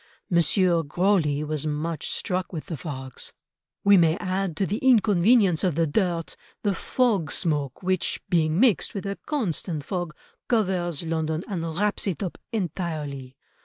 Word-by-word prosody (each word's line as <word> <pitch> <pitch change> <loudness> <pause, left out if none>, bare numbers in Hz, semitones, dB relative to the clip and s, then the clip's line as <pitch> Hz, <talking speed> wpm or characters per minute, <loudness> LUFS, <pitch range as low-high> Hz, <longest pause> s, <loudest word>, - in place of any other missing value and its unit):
M. 170 - +3
Grosley 170 -2 +2
was 155 0 -1
much 155 +1 -2
struck 185 0 -1
with 160 -4 -5
the 175 - -5
fogs: 130 -3 -5 0.5
"We 200 0 +7
may 165 -1 +4
add 185 -3 -2
to 195 - +1
the 205 +5 -2
inconvenience 210 -6 +4
of 180 -6 +1
the 165 +1 +2
dirt 170 0 -1 0.3
the 205 - +2
fog 205 - 0
smoke 145 -2 -1
which, 185 -1 0
being 160 -1 +2
mixed 235 -2 +3
with 200 - -4
a 195 0 -4
constant 180 - -2
fog, 175 -5 -3 0.3
covers 180 - 0
London 160 0 -1
and 185 -6 -3
wraps 205 +1 0
it 185 -2 -2
up 180 - -5
entirely.... 155 - -4
175 Hz, 150 wpm, -25 LUFS, 155-195 Hz, 0.5 s, We